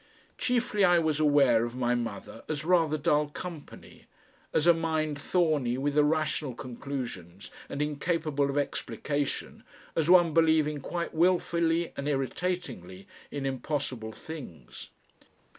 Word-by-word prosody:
Chiefly 245 Hz, -5 st, +1 dB
I 175 Hz, -2 st, +6 dB
was 160 Hz, -3 st, +1 dB
aware 140 Hz, -6 st, +4 dB
of 120 Hz, +1 st, -4 dB
my 125 Hz, -1 st, +1 dB
mother 115 Hz, -2 st, -5 dB
as 155 Hz, -1 st, -3 dB
rather 165 Hz, -3 st, +3 dB
dull 150 Hz, -1 st, +2 dB
company, 165 Hz, -1 st, -10 dB, 0.4 s
as 150 Hz, -, +1 dB
a 170 Hz, -, +7 dB
mind 160 Hz, -3 st, -1 dB
thorny 150 Hz, -10 st, +1 dB
with 140 Hz, +2 st, -1 dB
irrational 150 Hz, -3 st, +1 dB
conclusions 120 Hz, -9 st, -6 dB, 0.2 s
and 145 Hz, -, -1 dB
incapable 150 Hz, -1 st, -1 dB
of 140 Hz, -, -2 dB
explication, 145 Hz, 0 st, -3 dB, 0.3 s
as 160 Hz, 0 st, +1 dB
one 175 Hz, -3 st, +6 dB
believing 160 Hz, -2 st, +3 dB
quite 170 Hz, +4 st, -4 dB
wilfully 170 Hz, -1 st, +2 dB
and 140 Hz, -, -4 dB
irritatingly 135 Hz, -, -3 dB, 0.2 s
in 140 Hz, -1 st, -4 dB
impossible 130 Hz, -4 st, -3 dB
things. 110 Hz, -, -10 dB
150 Hz, 125 wpm, -29 LUFS, 135-165 Hz, 0.4 s, a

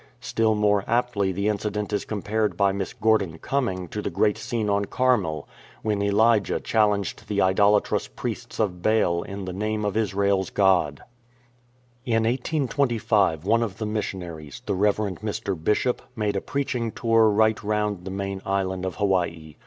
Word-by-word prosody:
Still 110 Hz, -1 st, +1 dB
more 105 Hz, -1 st, +2 dB
aptly 115 Hz, -5 st, +1 dB
the 100 Hz, +3 st, -1 dB
incident 105 Hz, 0 st, -2 dB
is 105 Hz, -, -1 dB
compared 105 Hz, +1 st, -1 dB
by 100 Hz, -1 st, +3 dB
Miss 95 Hz, -1 st, -3 dB
Gordon 105 Hz, -6 st, +1 dB
Gumming 95 Hz, -10 st, -1 dB
to 105 Hz, -, -4 dB
the -, -, -2 dB
great 105 Hz, -1 st, +2 dB
scene 110 Hz, 0 st, -3 dB
on 100 Hz, 0 st, +1 dB
Carmel, 105 Hz, -12 st, 0 dB, 0.4 s
when 105 Hz, -2 st, 0 dB
Elijah 105 Hz, +1 st, +3 dB
challenged 105 Hz, -3 st, 0 dB
the 100 Hz, -1 st, -1 dB
idolatrous 100 Hz, +2 st, +3 dB
priests -, -, -6 dB
of 90 Hz, -5 st, -1 dB
Baal 90 Hz, -5 st, +2 dB
in 100 Hz, +1 st, -6 dB
the 90 Hz, -, -5 dB
name 105 Hz, +2 st, -2 dB
of 105 Hz, -, -1 dB
Israel's 100 Hz, -3 st, +1 dB
God. 90 Hz, -7 st, +2 dB, 1.0 s
In 115 Hz, -3 st, +1 dB
1825 120 Hz, -, +1 dB
one 115 Hz, +3 st, +3 dB
of 105 Hz, -5 st, -3 dB
the 110 Hz, -, -3 dB
missionaries, 90 Hz, -8 st, -5 dB
the -, -, -1 dB
Rev. 100 Hz, +2 st, +2 dB
Mr. 105 Hz, -1 st, -3 dB
Bishop, 120 Hz, +6 st, +1 dB
made 105 Hz, -3 st, -1 dB
a 100 Hz, -, 0 dB
preaching 125 Hz, -5 st, -2 dB
tour 115 Hz, -1 st, +3 dB
right 110 Hz, +1 st, +2 dB
round 105 Hz, -3 st, -1 dB
the 95 Hz, -, -6 dB
main 100 Hz, 0 st, -4 dB
island 95 Hz, -1 st, -1 dB
of 95 Hz, -, -3 dB
Hawaii. 85 Hz, -6 st, -1 dB
105 Hz, 160 wpm, -25 LUFS, 95-110 Hz, 1.0 s, by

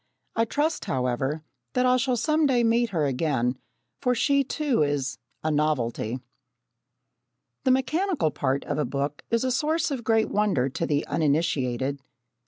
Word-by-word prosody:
I 230 Hz, -, +3 dB
trust, 295 Hz, +6 st, -1 dB
however, 130 Hz, +4 st, -1 dB, 0.3 s
that 250 Hz, -1 st, +2 dB
I 250 Hz, 0 st, +4 dB
shall 255 Hz, -1 st, +1 dB
some 305 Hz, +4 st, +2 dB
day 245 Hz, -3 st, +3 dB
meet 230 Hz, +1 st, +3 dB
her 165 Hz, -7 st, 0 dB
again, 130 Hz, -3 st, 0 dB, 0.4 s
for 250 Hz, -2 st, +2 dB
she 280 Hz, +3 st, +3 dB
too 280 Hz, -, 0 dB
is 145 Hz, -2 st, 0 dB, 0.2 s
"a 155 Hz, -, +1 dB
novelty!" 130 Hz, -6 st, 0 dB, 1.5 s
The -, -, +4 dB
mechanical 280 Hz, -, +1 dB
part 140 Hz, -1 st, -1 dB
of 145 Hz, 0 st, -2 dB
a -, -, +2 dB
book 140 Hz, +3 st, -3 dB
is 230 Hz, +1 st, +1 dB
a 260 Hz, -, +1 dB
source 310 Hz, +4 st, +1 dB
of 260 Hz, -4 st, -3 dB
great 225 Hz, -1 st, +2 dB
wonder 195 Hz, -12 st, +2 dB
to 165 Hz, +5 st, -2 dB
the 145 Hz, 0 st, 0 dB
uninitiated. 140 Hz, -4 st, 0 dB
160 Hz, 155 wpm, -26 LUFS, -, 1.5 s, I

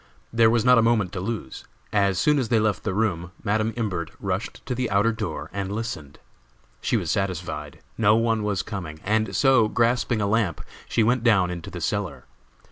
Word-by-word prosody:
There 115 Hz, -1 st, +5 dB
was 115 Hz, 0 st, +2 dB
not 125 Hz, -1 st, +7 dB
a -, -, +5 dB
moment 115 Hz, -5 st, +2 dB
to 95 Hz, -, -4 dB
lose. 100 Hz, -, -5 dB, 0.3 s
As 100 Hz, -3 st, +2 dB
soon 150 Hz, +9 st, +3 dB
as 125 Hz, -, -2 dB
they 115 Hz, -2 st, +3 dB
left 105 Hz, -3 st, 0 dB
the 100 Hz, -, -1 dB
room 95 Hz, -5 st, -1 dB
Madam 110 Hz, +1 st, +1 dB
Imbert 95 Hz, -8 st, -2 dB
rushed -, -, -4 dB
to -, -, -2 dB
the 125 Hz, -1 st, -2 dB
outer 100 Hz, +3 st, +3 dB
door 85 Hz, -9 st, -5 dB
and 100 Hz, 0 st, -3 dB
listened. 100 Hz, -10 st, -5 dB, 0.6 s
She -, -, +1 dB
was -, -, -2 dB
satisfied. 90 Hz, -6 st, -3 dB, 0.2 s
No 105 Hz, -1 st, +5 dB
one 115 Hz, -1 st, +1 dB
was 100 Hz, -3 st, -1 dB
coming, 85 Hz, -7 st, -6 dB
and 110 Hz, -1 st, 0 dB
so, 130 Hz, -2 st, +4 dB
grasping 120 Hz, +1 st, +1 dB
a 100 Hz, -, +1 dB
lamp, 100 Hz, -5 st, 0 dB, 0.3 s
she 115 Hz, -, +2 dB
went 120 Hz, +2 st, +2 dB
down 95 Hz, -7 st, +4 dB
into 85 Hz, -2 st, -6 dB
the 85 Hz, -, -7 dB
cellar. 90 Hz, -, -2 dB
105 Hz, 195 wpm, -24 LUFS, 95-115 Hz, 0.6 s, not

